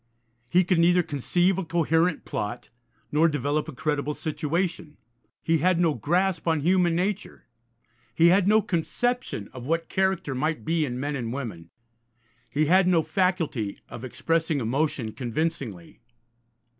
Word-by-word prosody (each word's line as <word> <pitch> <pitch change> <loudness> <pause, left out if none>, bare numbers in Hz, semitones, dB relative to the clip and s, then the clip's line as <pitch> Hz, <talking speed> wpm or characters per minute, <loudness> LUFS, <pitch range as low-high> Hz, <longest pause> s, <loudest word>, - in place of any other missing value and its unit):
He 180 +7 +4
could 180 -1 +1
neither 175 +1 +4
conceive 175 +6 +1
a - - -2
coherent 165 0 +1
plot, 105 +4 -4 0.4
nor 155 +3 +4
develop 145 +1 -1
a - - -5
credible 145 +1 -2
situation. 160 0 -3 0.5
He 165 -1 +2
had 180 +2 +2
no 165 -3 +3
grasp 175 - 0
on 160 -2 +2
human 175 +1 +3
nature, 195 +3 -3 0.7
he 170 +1 +6
had 190 +1 +4
no 215 +1 +4
conception 200 - -2
of 130 -1 -8
what 165 +1 -1
character 190 -7 0
might 155 +5 -2
be 160 -1 +1
in 125 -2 -4
men 145 +2 -2
and 120 -4 -3
women, 105 -11 -6 0.8
he 150 +2 +1
had 180 +4 +4
no 170 -3 +3
faculty 165 - -1
of 120 - -9
expressing 160 +4 -1
emotion 130 -1 -1
convincingly. 120 - -4
160 Hz, 145 wpm, -26 LUFS, 140-180 Hz, 0.8 s, he